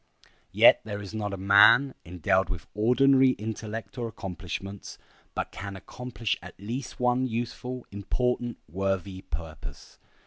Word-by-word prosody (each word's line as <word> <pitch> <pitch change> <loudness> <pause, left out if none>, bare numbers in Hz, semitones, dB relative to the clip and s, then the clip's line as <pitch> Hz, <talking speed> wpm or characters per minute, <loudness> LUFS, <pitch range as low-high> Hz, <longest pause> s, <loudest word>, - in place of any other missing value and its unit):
Yet - - +7
there 105 -1 -5
is 100 0 -8
not 105 -2 -2
a 100 - -4
man, 100 +8 +6
endowed 90 +2 +1
with 90 -5 -5
ordinary 130 +4 +5
intellect 110 +1 -6
or 120 - -2
accomplishments, 95 -1 -6 0.4
but - - -2
can 100 -1 -6
accomplish 115 +3 -4
at 90 +1 -12
least 120 +6 -5
one 125 +1 +2
useful, 120 +2 -4
important, 120 +4 -1
worthy 95 +2 -2
purpose. 75 -2 -8
105 Hz, 130 wpm, -27 LUFS, 95-125 Hz, 0.4 s, Yet